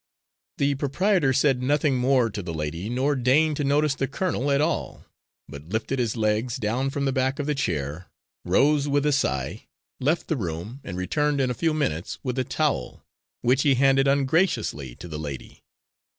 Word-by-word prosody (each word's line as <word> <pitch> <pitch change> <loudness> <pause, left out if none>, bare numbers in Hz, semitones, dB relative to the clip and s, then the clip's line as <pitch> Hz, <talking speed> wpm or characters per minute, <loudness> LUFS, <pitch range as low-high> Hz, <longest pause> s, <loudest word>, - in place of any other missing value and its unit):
The 140 0 +2
proprietor 145 +3 +1
said 135 -1 +2
nothing 140 +1 +2
more 125 -2 +2
to 100 - -4
the 85 -3 -5
lady, 80 +6 -4
nor 135 +4 +1
deigned 140 +5 +3
to 145 - -1
notice 145 +1 +2
the 135 0 -2
colonel 145 -2 -1
at 140 0 +3
all, 155 +3 -2 0.4
but 70 +3 -11
lifted 110 +6 -2
his 115 -1 -1
legs 110 +2 0
down 120 +6 -1
from 140 0 -2
the 135 - +1
back 130 0 0
of 145 - -2
the 150 - 0
chair, 80 - -3 0.4
rose 145 0 +3
with 145 0 +1
a 150 - +3
sigh, 70 - -1 0.3
left 150 +6 0
the 160 - 0
room 95 - -5
and 90 - -6
returned 145 +10 0
in 130 -2 +1
a - - 0
few 160 +6 0
minutes 85 - -2
with 130 -1 -2
a - - +2
towel, - - -2 0.4
which 125 +2 +3
he 140 -2 +4
handed 135 +1 +4
ungraciously 135 - +1
to - - -10
the 75 -2 -6
lady. 70 -4 -8
135 Hz, 185 wpm, -25 LUFS, 105-145 Hz, 0.4 s, he